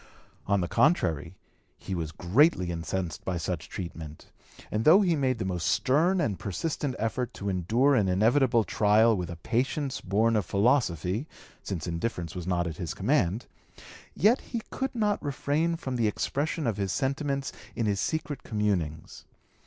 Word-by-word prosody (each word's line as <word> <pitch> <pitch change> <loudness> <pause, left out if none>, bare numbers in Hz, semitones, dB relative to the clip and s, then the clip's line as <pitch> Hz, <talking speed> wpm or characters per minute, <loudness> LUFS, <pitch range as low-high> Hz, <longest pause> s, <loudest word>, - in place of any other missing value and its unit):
On 100 -1 +2
the 85 - -1
contrary 85 - +1 0.4
he 95 - -6
was 80 -4 -3
greatly 90 - +3
incensed 85 0 -3
by 90 -2 -2
such 85 -1 -4
treatment, 80 -4 -8 0.4
and 105 +1 0
though 175 - +7
he 175 -4 +2
made 130 -4 +1
the 95 - -3
most 90 -4 -2
stern 165 +8 +2
and 105 - -1
persistent 140 - -3
effort 120 +2 -2
to 100 - -3
endure 110 - +2
an 105 -7 +3
inevitable 115 +5 +3
trial 110 +2 +4
with 90 -3 -3
a 85 - -5
patience 130 - -1
born 110 +4 +2
of 105 - +2
philosophy, 100 - +1 0.3
since 85 -6 -4
indifference 85 -1 -3
was 90 -2 -6
not 90 -1 +1
at 80 -2 -5
his 85 - -4
command, 100 +8 +1 0.7
yet 225 +6 +4
he 230 -3 -5
could 265 -1 -3
not 210 -3 +1
refrain 145 +4 0
from 130 -6 -4
the 115 -2 +2
expression 145 +8 -1
of 110 -4 0
his 100 -2 -1
sentiments 140 - -1 0.2
in 115 - -1
his 100 -2 0
secret 150 +3 -2
communings. 95 -8 -2
110 Hz, 160 wpm, -28 LUFS, 90-140 Hz, 0.7 s, though